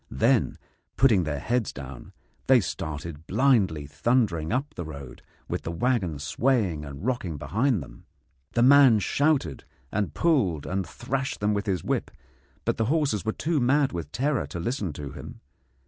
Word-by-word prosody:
Then, 65 Hz, -, +2 dB, 0.4 s
putting 110 Hz, -9 st, +4 dB
their 75 Hz, -1 st, -2 dB
heads 120 Hz, -, -1 dB
down, 65 Hz, -1 st, -9 dB, 0.4 s
they 130 Hz, -1 st, +7 dB
started 80 Hz, -4 st, -5 dB
blindly 100 Hz, -, +2 dB
thundering 85 Hz, -, 0 dB
up 135 Hz, +4 st, -1 dB
the 90 Hz, -, -5 dB
road, 70 Hz, -5 st, -9 dB, 0.3 s
with -, -, -3 dB
the 85 Hz, -, -4 dB
waggon 95 Hz, -, 0 dB
swaying 95 Hz, -, 0 dB
and 70 Hz, +5 st, -8 dB
rocking 110 Hz, -, -2 dB
behind 105 Hz, -, 0 dB
them. -, -, -15 dB, 0.5 s
The 120 Hz, -, +3 dB
man 135 Hz, -3 st, +7 dB
shouted 145 Hz, +8 st, +1 dB, 0.3 s
and 100 Hz, -7 st, -2 dB
pulled 105 Hz, -, +2 dB
and 95 Hz, -1 st, -2 dB
thrashed 130 Hz, +8 st, -3 dB
them 105 Hz, +1 st, +1 dB
with 100 Hz, +1 st, -2 dB
his 95 Hz, -5 st, 0 dB
whip, -, -, -1 dB, 0.6 s
but -, -, 0 dB
the 110 Hz, -, +1 dB
horses 140 Hz, -, +1 dB
were 110 Hz, -, 0 dB
too 155 Hz, +6 st, -1 dB
mad 135 Hz, +3 st, +3 dB
with 85 Hz, -4 st, -5 dB
terror 135 Hz, -, 0 dB
to 85 Hz, -, -6 dB
listen 100 Hz, -, -2 dB
to 70 Hz, -1 st, -7 dB
him. -, -, -9 dB
100 Hz, 165 wpm, -26 LUFS, 80-130 Hz, 0.6 s, they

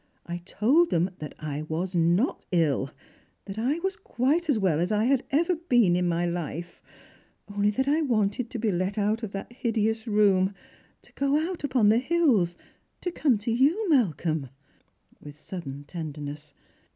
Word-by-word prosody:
I 175 Hz, 0 st, -4 dB
told 280 Hz, -, +3 dB
them 175 Hz, +2 st, +1 dB
that 150 Hz, -, -7 dB
I 150 Hz, -1 st, -4 dB
was 165 Hz, +4 st, -3 dB
not 175 Hz, -, +2 dB
ill 150 Hz, -6 st, +1 dB, 0.3 s
— -, -, -37 dB
that 195 Hz, +1 st, -6 dB
I 265 Hz, +7 st, +1 dB
was 385 Hz, 0 st, 0 dB
quite 320 Hz, -, 0 dB
as 275 Hz, -, +3 dB
well 185 Hz, -7 st, +1 dB
as 175 Hz, +2 st, 0 dB
^ 215 Hz, +2 st, +2 dB
had 270 Hz, -1 st, +2 dB
ever 330 Hz, +6 st, +2 dB
been 240 Hz, -, +3 dB
in 180 Hz, 0 st, +1 dB
my 170 Hz, 0 st, 0 dB
life 170 Hz, 0 st, -4 dB, 0.3 s
— -, -, -34 dB
only 205 Hz, 0 st, +3 dB
that 265 Hz, +6 st, -1 dB
I 300 Hz, +3 st, +3 dB
wanted 225 Hz, -3 st, 0 dB
to 250 Hz, -, -5 dB
be 220 Hz, -2 st, 0 dB
let 185 Hz, +3 st, -1 dB
out 210 Hz, +2 st, +1 dB
of 220 Hz, -, -4 dB
that 195 Hz, +4 st, -6 dB
hideous 225 Hz, -2 st, -1 dB
room, 200 Hz, -2 st, +3 dB, 0.5 s
to -, -, -16 dB
go 280 Hz, +1 st, +1 dB
out 335 Hz, +1 st, -3 dB
upon 250 Hz, -7 st, +3 dB
the 220 Hz, +2 st, +5 dB
hills, 255 Hz, -, +2 dB, 0.4 s
to 360 Hz, -, -2 dB
come 280 Hz, -8 st, +2 dB
to 210 Hz, +3 st, -3 dB
you, 300 Hz, -, +2 dB
Malcolm," 160 Hz, -, +1 dB, 0.7 s
with 145 Hz, -1 st, -11 dB
sudden 150 Hz, -5 st, -7 dB
tenderness. 150 Hz, -2 st, -7 dB
210 Hz, 175 wpm, -27 LUFS, 170-260 Hz, 0.7 s, the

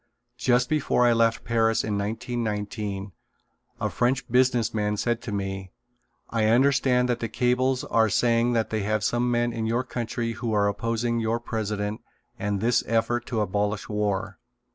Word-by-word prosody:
Just 125 Hz, +1 st, +3 dB
before 145 Hz, -4 st, +2 dB
I 120 Hz, -, +5 dB
left 115 Hz, 0 st, +2 dB
Paris 115 Hz, -1 st, +2 dB
in 105 Hz, -1 st, -2 dB
1919 105 Hz, -2 st, -3 dB, 0.7 s
a -, -, -1 dB
French 125 Hz, +1 st, 0 dB
business 125 Hz, -2 st, +3 dB
man 105 Hz, -1 st, 0 dB
said 120 Hz, +2 st, 0 dB
to 110 Hz, -, -6 dB
me: 95 Hz, -1 st, -4 dB, 0.6 s
"I 115 Hz, -2 st, +1 dB
understand 125 Hz, +1 st, +3 dB
that 120 Hz, -1 st, 0 dB
the 115 Hz, -, -3 dB
cables 125 Hz, +2 st, +1 dB
are 110 Hz, -1 st, +2 dB
saying 120 Hz, +3 st, +2 dB
that 115 Hz, -1 st, 0 dB
you 110 Hz, -, 0 dB
have 105 Hz, +1 st, 0 dB
some 120 Hz, +2 st, +1 dB
men 120 Hz, 0 st, +1 dB
in 110 Hz, -1 st, -2 dB
your 120 Hz, +3 st, 0 dB
country 120 Hz, -1 st, -3 dB
who 115 Hz, 0 st, -3 dB
are 100 Hz, -1 st, +3 dB
opposing 115 Hz, +3 st, -1 dB
your 115 Hz, +1 st, 0 dB
president 105 Hz, -2 st, -3 dB, 0.4 s
and 100 Hz, -1 st, -1 dB
this 120 Hz, +2 st, +2 dB
effort 115 Hz, +1 st, 0 dB
to 115 Hz, -3 st, -1 dB
abolish 105 Hz, +1 st, -1 dB
war. 105 Hz, -2 st, -2 dB
115 Hz, 165 wpm, -25 LUFS, 105-120 Hz, 0.7 s, I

